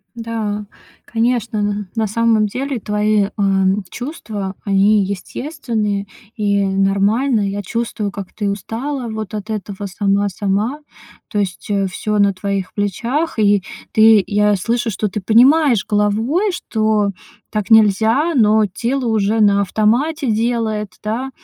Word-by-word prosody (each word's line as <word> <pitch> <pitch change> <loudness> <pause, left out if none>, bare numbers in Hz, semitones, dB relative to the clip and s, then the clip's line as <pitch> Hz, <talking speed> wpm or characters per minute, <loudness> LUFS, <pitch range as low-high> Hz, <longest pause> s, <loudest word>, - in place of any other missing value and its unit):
Да, 220 -3 -3 0.4
конечно, 230 -1 -1
н 205 -1 -1
на 225 -2 0
самом 225 0 +2
деле 260 +4 -3
твои, 210 0 +1
э, - - -5 0.6
чувства 215 -8 -5
они 200 +1 +3
естественные 210 - -3 0.3
и 200 -2 +1
нормальные. 200 +4 +1
Я 205 +1 -3
чувствую, 225 0 -3
как 200 -2 -7
ты 205 -2 -2
устала 235 +6 -4
вот 220 -2 -5
от 210 0 -5
этого 205 -1 -5
"сама-сама". 200 +5 -1 0.5
То 210 - -1
есть, 195 -1 -3
э, 200 -1 +1
всё 210 +3 -2
на 200 -1 +4
твоих 195 0 -3
плечах, 235 - -2
и 205 -2 +4 0.3
ты, 220 -2 +6
я 210 0 +2
слышу, 230 +5 -1
что 210 0 -2
ты 200 - -4
понимаешь 245 - +4
головой, 225 - +1
что 215 - 0 0.4
так 210 -2 -2
нельзя, 225 - +4
но 215 -3 +4
тело 245 +6 -1
уже 220 0 +1
на 200 -1 +4
автомате 240 - +1
делает, 220 -2 -1
да, 230 +5 -2
215 Hz, 130 wpm, -18 LUFS, 200-230 Hz, 0.6 s, ты